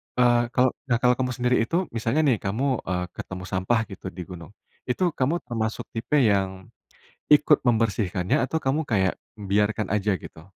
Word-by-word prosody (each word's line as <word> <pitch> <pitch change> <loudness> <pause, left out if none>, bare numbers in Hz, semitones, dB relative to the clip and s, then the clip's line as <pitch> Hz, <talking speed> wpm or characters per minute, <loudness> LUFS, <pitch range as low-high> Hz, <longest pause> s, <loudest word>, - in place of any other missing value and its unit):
eee, 120 -1 +4
kalau 125 0 +4 0.2
nah 120 - +2
kalau 125 0 +5
kamu 125 -1 0
sendiri 125 0 +1
itu, 170 +10 0
misalnya 115 +6 0
nih, 130 -7 +3
kamu, 125 +6 -1
eee, 90 -1 -1
ketemu 90 -1 -7
sampah 95 +6 +1
gitu 95 0 -8
di 90 0 -6
gunung, 90 +1 -10 0.4
itu 175 +7 +1
kamu 150 +6 -1
termasuk 110 -2 -3
tipe 115 +6 -2
yang 95 -3 0 0.6
ikut 150 -1 +5
membersihkannya 110 -5 +1
atau 160 +5 -2
kamu 145 +4 0
kayak 95 -7 +1 0.3
biarkan 105 +1 0
aja 105 0 +1
gitu? 80 - -11
115 Hz, 165 wpm, -25 LUFS, 95-125 Hz, 0.6 s, kalau